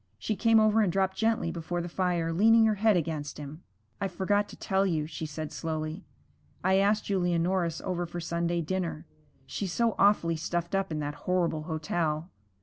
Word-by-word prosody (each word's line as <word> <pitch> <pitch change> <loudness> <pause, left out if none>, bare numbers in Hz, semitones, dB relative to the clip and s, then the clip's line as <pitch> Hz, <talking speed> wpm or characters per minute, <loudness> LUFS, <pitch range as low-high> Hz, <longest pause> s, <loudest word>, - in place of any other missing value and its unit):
She 215 - -2
came 225 +2 +4
over 215 0 +4
and 200 -5 +2
dropped 190 +1 +1
gently 225 -6 +1
before 175 +1 -3
the 175 - -3
fire, 175 -2 0
leaning 225 +5 +5
her 220 - +3
head 210 -1 +3
against 155 -3 -3
him. 150 +3 -8 0.4
'I 200 - +1
forgot 205 +3 0
to - - -10
tell 195 0 +1
you,' 160 -6 0
she 155 0 -5
said 155 0 -6
slowly. 160 +3 -4 0.6
'I 190 +1 +4
asked 205 +2 +2
Julia 180 -3 +1
Norris 170 -1 0
over 175 -2 -2
for 175 +1 -6
Sunday 170 0 -1
dinner. 170 -1 -3 0.4
She's 185 +7 -4
so 235 -2 +2
awfully 180 -5 +4
stuffed 170 +2 -3
up 195 -2 0
in 155 -1 -2
that 145 0 -3 0.2
horrible 170 -4 +1
hotel.' 160 +1 -2
175 Hz, 185 wpm, -29 LUFS, 165-195 Hz, 0.6 s, leaning